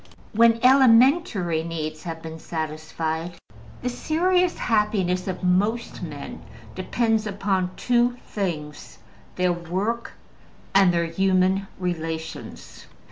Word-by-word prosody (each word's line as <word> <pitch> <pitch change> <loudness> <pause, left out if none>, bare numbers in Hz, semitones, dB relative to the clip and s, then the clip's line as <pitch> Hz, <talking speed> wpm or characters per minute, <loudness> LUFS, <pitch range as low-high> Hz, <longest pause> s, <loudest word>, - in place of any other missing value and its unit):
When 230 +1 +5
elementary 250 - +5
needs 155 -2 -4
have 165 -1 -6
been 160 0 -7
satisfied, 160 +1 -4 0.5
the 250 - 0
serious 360 +7 +1
happiness 205 -5 0
of 185 0 -4
most 205 +6 0
men - - -7 0.3
depends 225 -2 0
upon 195 -2 -1
two 245 0 +1
things: 155 -7 -5 0.4
their 180 -1 +2
work, 190 +7 -3 0.6
and 195 -2 +6
their 170 -1 +1
human 190 +2 +1
relations. 165 -3 -5
185 Hz, 100 wpm, -24 LUFS, 165-230 Hz, 0.6 s, and